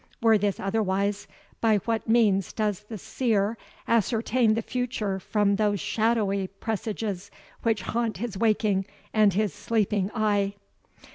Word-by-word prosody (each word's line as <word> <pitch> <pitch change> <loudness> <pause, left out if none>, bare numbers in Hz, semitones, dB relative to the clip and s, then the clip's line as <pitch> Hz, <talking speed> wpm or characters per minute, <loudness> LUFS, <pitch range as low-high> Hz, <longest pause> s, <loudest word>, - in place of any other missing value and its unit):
Were 225 -2 +4
this 200 -1 0
otherwise, 200 0 0 0.3
by 220 -2 +4
what 225 -1 -1
means 210 -5 +3
does 210 -2 -1
the 220 - -5
Seer 215 0 0 0.3
ascertain 230 0 +2
the 225 - -1
future 230 -6 -2
from 200 +1 +1
those 205 -1 +1
shadowy 210 -1 +1
presages 205 -1 -4 0.3
which 220 -4 0
haunt 230 -3 -1
his 220 0 -4
waking 210 -2 +1 0.3
and 215 -3 +4
his 210 0 +1
sleeping 210 -3 0
eye? 205 -2 +1
210 Hz, 130 wpm, -26 LUFS, 200-225 Hz, 0.3 s, Were